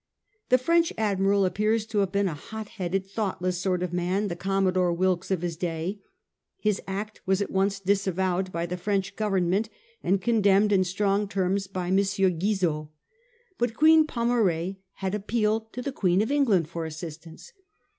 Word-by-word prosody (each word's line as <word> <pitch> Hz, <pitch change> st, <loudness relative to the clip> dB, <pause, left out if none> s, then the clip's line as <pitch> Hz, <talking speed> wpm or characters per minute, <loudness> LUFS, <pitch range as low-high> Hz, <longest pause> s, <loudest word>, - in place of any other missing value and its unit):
The 255 Hz, -, +6 dB
French 335 Hz, +6 st, +2 dB
admiral 200 Hz, -2 st, +2 dB
appears 215 Hz, +4 st, +1 dB
to 220 Hz, -1 st, -1 dB
have 195 Hz, -2 st, +1 dB
been 200 Hz, 0 st, +1 dB
a 175 Hz, -, -2 dB
hot 215 Hz, +8 st, -8 dB
headed, 190 Hz, -1 st, -2 dB
thoughtless 190 Hz, -3 st, -2 dB
sort 180 Hz, -1 st, 0 dB
of 180 Hz, -1 st, -3 dB
man, 185 Hz, +4 st, 0 dB
the 170 Hz, -, -3 dB
Commodore 185 Hz, -1 st, +1 dB
Wilkes 185 Hz, +1 st, 0 dB
of 185 Hz, -3 st, -1 dB
his 170 Hz, -2 st, -2 dB
day. 170 Hz, +4 st, -3 dB, 0.6 s
His 210 Hz, -2 st, 0 dB
act 205 Hz, +2 st, -5 dB
was 190 Hz, 0 st, +2 dB
at 200 Hz, -, -2 dB
once 195 Hz, +1 st, +1 dB
disavowed 190 Hz, -1 st, 0 dB
by 170 Hz, -1 st, -2 dB
the 180 Hz, +1 st, -4 dB
French 195 Hz, +1 st, -1 dB
Government, 195 Hz, 0 st, 0 dB, 0.3 s
and 190 Hz, +2 st, +1 dB
condemned 205 Hz, -2 st, +3 dB
in 190 Hz, -2 st, +4 dB
strong 200 Hz, +2 st, 0 dB
terms 195 Hz, 0 st, -1 dB
by 185 Hz, -2 st, -4 dB
M. 190 Hz, -, +3 dB
Guizot. 190 Hz, -4 st, +1 dB, 0.7 s
But 240 Hz, -1 st, 0 dB
Queen 315 Hz, +2 st, +6 dB
Pomare 200 Hz, -, 0 dB, 0.2 s
had 190 Hz, 0 st, -4 dB
appealed 220 Hz, +1 st, 0 dB
to 250 Hz, -, -5 dB
the 280 Hz, -, -2 dB
Queen 190 Hz, -5 st, +2 dB
of 225 Hz, -, -3 dB
England 225 Hz, -, +3 dB
for 170 Hz, 0 st, -5 dB
assistance. 160 Hz, -, -9 dB
195 Hz, 165 wpm, -26 LUFS, 180-210 Hz, 0.7 s, The